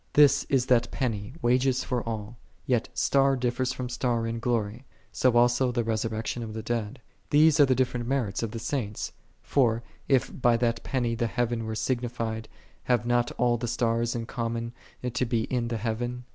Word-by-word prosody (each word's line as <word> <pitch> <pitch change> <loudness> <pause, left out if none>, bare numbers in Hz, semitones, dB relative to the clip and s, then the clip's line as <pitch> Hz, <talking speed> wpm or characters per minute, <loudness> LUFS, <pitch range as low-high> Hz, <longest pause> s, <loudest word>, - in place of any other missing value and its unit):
3 150 - +9
This 140 0 +4
is 130 -3 +1
that 125 -2 +3
penny, 115 -2 -3
wages 125 +2 +2
for 125 -2 -1
all. 110 +2 -5 0.3
Yet 120 -3 +1
" - - -35
star 135 0 +4
differeth 125 0 0
from 125 - -4
star 120 -1 -1
in 115 0 -3
^lory; 115 -1 -1 0.3
so 125 -2 +2
also 120 +1 +4
the 120 -1 0
resurrection 110 +1 -2
of 110 -2 -6
the 110 - -4
dead."3 115 +1 -2 0.3
These 150 0 +5
are 145 - +7
the 130 - +3
different 125 -2 0
merits 125 -7 -1
of 115 - -2
the 115 - -6
Saints. 115 -3 -3 0.3
For, 120 -4 +2 0.2
if 135 -3 +2
by 120 -1 +4
that 115 -1 0
penny 120 -3 -1
the 120 0 0
heaven 115 0 -1
were 110 - -3
signified, 115 -2 -2 0.4
have 120 -3 +2
not 120 0 +2
all 120 -1 +2
the 120 +1 -3
stars 115 0 0
in 115 -1 -3
common 115 -1 -3 0.3
to 125 0 -1
be 115 -1 +1
in 120 -2 0
the 115 -1 -2
heaven? 120 +3 -3
120 Hz, 190 wpm, -27 LUFS, 115-125 Hz, 0.4 s, 3